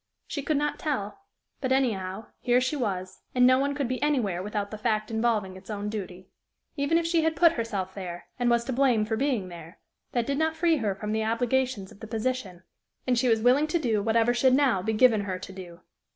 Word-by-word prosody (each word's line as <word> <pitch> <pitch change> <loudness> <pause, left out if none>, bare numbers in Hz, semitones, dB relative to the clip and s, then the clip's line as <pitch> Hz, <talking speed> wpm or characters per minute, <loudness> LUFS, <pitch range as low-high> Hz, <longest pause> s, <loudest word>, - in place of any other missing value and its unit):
She 285 - -4
could 300 +1 0
not 295 +1 -1
tell; 235 -10 -3 0.4
but, 260 -2 -2
anyhow, 215 -6 0
here 245 0 +3
she 255 +4 -1
was, 190 -8 -3 0.2
and 250 0 +5
no 255 +1 +5
one 280 +1 0
could 280 -3 -1
be 255 +1 -3
anywhere 240 -12 +1
without 205 0 -3
the 215 - -5
fact 215 -1 -1
involving 220 -4 0
its 190 +2 -14
own 205 -1 -3
duty. 185 -3 -6 0.5
Even 285 +2 +2
if 335 - 0
she 335 0 +2
had 320 0 +1
put 335 -1 +6
herself 205 - -3
there, 175 -3 -7
and 245 -1 +2
was 235 0 +3
to 260 - -3
blame 245 -4 +3
for 220 +1 -1
being 245 -7 -1
there, 170 +1 -11 0.4
that 240 -2 +1
did 280 +2 -1
not 320 0 +1
free 325 0 +2
her 210 -7 -1
from 210 +1 -5
the 220 0 0
obligations 230 -2 0
of - - -16
the 220 - -8
position, 220 -5 -3 0.4
and 250 -2 +2
she 255 - +1
was 225 -1 +3
willing 265 +5 +4
to 340 - +1
do 230 -9 0
whatever 225 +3 +2
should 255 +1 +4
now 260 -9 +3
be 220 +4 -1
given 220 -1 +4
her 190 -2 -3
to 190 - -9
do. 180 -2 -10
230 Hz, 225 wpm, -27 LUFS, 200-265 Hz, 0.5 s, put